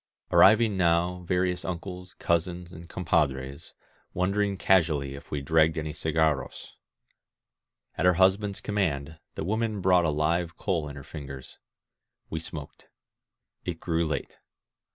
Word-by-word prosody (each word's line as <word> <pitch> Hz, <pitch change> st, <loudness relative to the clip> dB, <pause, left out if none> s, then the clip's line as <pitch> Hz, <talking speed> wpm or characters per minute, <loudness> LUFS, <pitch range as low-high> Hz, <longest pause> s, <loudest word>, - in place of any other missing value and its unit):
Arrived 110 Hz, +4 st, +7 dB
now 90 Hz, -1 st, +1 dB
various 90 Hz, 0 st, 0 dB
uncles, 90 Hz, 0 st, -6 dB
cousins, 85 Hz, +1 st, -1 dB
and 85 Hz, 0 st, -11 dB
compadres, 70 Hz, -6 st, -1 dB, 0.4 s
wondering 100 Hz, +2 st, +1 dB
casually 80 Hz, -7 st, +2 dB
if 70 Hz, -, -11 dB
we 75 Hz, -, -3 dB
dragged 80 Hz, +2 st, +3 dB
any 75 Hz, -1 st, -3 dB
cigarros. 80 Hz, -3 st, -1 dB, 1.3 s
At 90 Hz, -, +4 dB
her 90 Hz, -, +5 dB
husband's 95 Hz, +2 st, +2 dB
command, 80 Hz, -7 st, -2 dB, 0.2 s
the -, -, -3 dB
woman 110 Hz, +3 st, -1 dB
brought 90 Hz, -2 st, +4 dB
a -, -, +2 dB
live 80 Hz, +3 st, 0 dB
coal 85 Hz, -7 st, -1 dB
in 70 Hz, -, -9 dB
her 70 Hz, -, -9 dB
fingers. 70 Hz, -3 st, -9 dB, 0.7 s
We 80 Hz, -, -2 dB
smoked. 80 Hz, -2 st, -9 dB, 0.8 s
It 85 Hz, -2 st, -4 dB
grew 85 Hz, -1 st, 0 dB
late. 75 Hz, -4 st, -4 dB
85 Hz, 130 wpm, -27 LUFS, 75-90 Hz, 1.3 s, Arrived